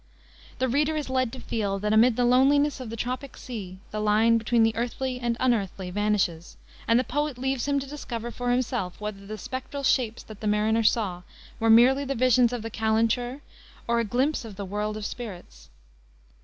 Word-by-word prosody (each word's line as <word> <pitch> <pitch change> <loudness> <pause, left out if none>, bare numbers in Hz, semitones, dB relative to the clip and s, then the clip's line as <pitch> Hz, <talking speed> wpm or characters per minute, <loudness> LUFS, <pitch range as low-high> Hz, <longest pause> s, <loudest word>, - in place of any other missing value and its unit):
The 260 - +1
reader 295 +5 +1
is 295 -3 -3
led 255 -2 +1
to 260 - -7
feel 200 -3 -2
that 210 +2 -1
amid 225 +2 +5
the 245 - +2
loneliness 275 +4 +4
of 255 -3 -6
the 230 - -5
tropic 255 +4 -4
sea, 195 -7 -7
the 215 - -3
line 220 +2 +3
between 225 +1 +2
the 225 0 +2
earthly 250 +2 -2
and 240 -1 -1
the 255 - -2
unearthly 195 -6 0
vanishes, 195 -4 -1 0.3
and 230 +1 +5
the - - +1
poet 290 +2 -2
leaves 265 0 -1
him 285 -1 +2
to 275 - -5
discover 240 -5 -6
for 245 0 -3
himself 245 -7 -1
whether 205 -2 -6
the 215 +1 -6
spectral 260 +4 -6
shapes 240 -4 +1
that 215 -2 -12
the 215 - -3
mariner 215 +2 +2
saw 210 -5 +1 0.4
were 225 - +2
merely 250 +5 +6
the 275 0 -2
visions 250 0 +4
of 245 -3 -4
the 225 - -5
calenture, 230 +4 0 0.5
or 235 0 +2
a - - +2
glimpse 255 +7 0
of 220 -3 -9
the 200 0 -5
world 210 +2 -3
of 215 - -5
spirits. 180 - -8
235 Hz, 200 wpm, -26 LUFS, 215-255 Hz, 0.5 s, merely